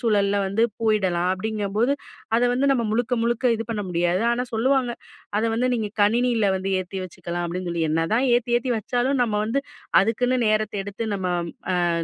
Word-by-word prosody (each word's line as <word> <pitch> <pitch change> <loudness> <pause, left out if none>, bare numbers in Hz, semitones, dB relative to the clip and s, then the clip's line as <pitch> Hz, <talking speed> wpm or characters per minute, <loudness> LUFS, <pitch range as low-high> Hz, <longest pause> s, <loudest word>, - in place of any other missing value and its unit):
சூழல்ல 205 -4 +2
வந்து 200 +4 0 0.2
போயிடலாம். 190 -5 +1
அப்டிங்கும்போது, 215 +4 -1 0.4
அத 240 - +2
வந்து 265 +3 +1
நம்ம 235 -3 0
முழுக்க 240 +2 +1
முழுக்க 235 +2 -1
இது 225 - -4
பண்ண 210 -3 -2
முடியாது. 175 +3 +1
ஆனா 250 +1 -1
சொல்லுவாங்க, 255 +2 +2 0.5
அத 220 - 0
வந்து 250 +3 +1
நீங்க 215 -3 -2
கணினியில 230 0 +2
வந்து 190 +1 -3
ஏத்தி 190 +1 -6
வச்சுக்கலாம் 175 -1 -5
அப்டின்னு 180 +1 -4
சொல்லி. 170 -1 -1
என்னதான் 165 +11 +1
ஏத்தி 240 0 +1
ஏத்தி 250 0 -2
வச்சாலும், 250 +5 0
நம்ம 220 -3 0
வந்து 250 +6 0 0.4
அதுக்குன்னு 245 +5 +1
நேரத்த 215 0 +1
எடுத்து 210 +2 -5
நம்ம 190 -2 -3 0.8
அ - - -2
220 Hz, 170 wpm, -24 LUFS, 195-240 Hz, 0.8 s, சூழல்ல